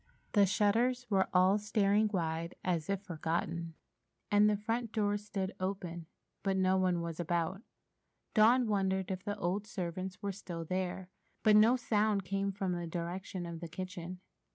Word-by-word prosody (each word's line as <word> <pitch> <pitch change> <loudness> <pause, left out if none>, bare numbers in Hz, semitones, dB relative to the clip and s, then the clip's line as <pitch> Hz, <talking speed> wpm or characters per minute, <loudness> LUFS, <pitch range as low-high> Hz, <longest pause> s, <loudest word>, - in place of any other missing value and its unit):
The 200 -2 +5
shutters 230 +6 +2
were 190 -1 +3
all 185 +2 +4
staring 210 0 +2
wide, 165 -2 -2
as 170 -3 -1
if 195 0 -1
forgotten, 170 -1 -3 0.6
and 205 +1 +6
the 210 - +2
front 225 +2 -2
door 205 -2 +1
stood 200 -2 -3
open, 180 -3 -4 0.3
but 195 -1 0
no 185 0 +3
one 185 -2 +2
was 170 -1 -5
about. 175 +3 -1 0.7
Dawn 240 +3 +5
wondered 190 -2 0
if 185 0 -4
the 205 0 -3
old 195 +3 -1
servants 185 0 -4
were 200 -1 -2
still 175 -4 -6
there, 185 +1 -3 0.3
but 215 -1 +6
no 220 +4 +7
sound 215 -5 +1
came 195 +1 -1
from 195 -1 -2
the 175 -1 -2
direction 175 +2 -4
of 170 -1 -6
the 170 - -6
kitchen. 185 +1 -6
190 Hz, 160 wpm, -33 LUFS, 175-205 Hz, 0.7 s, no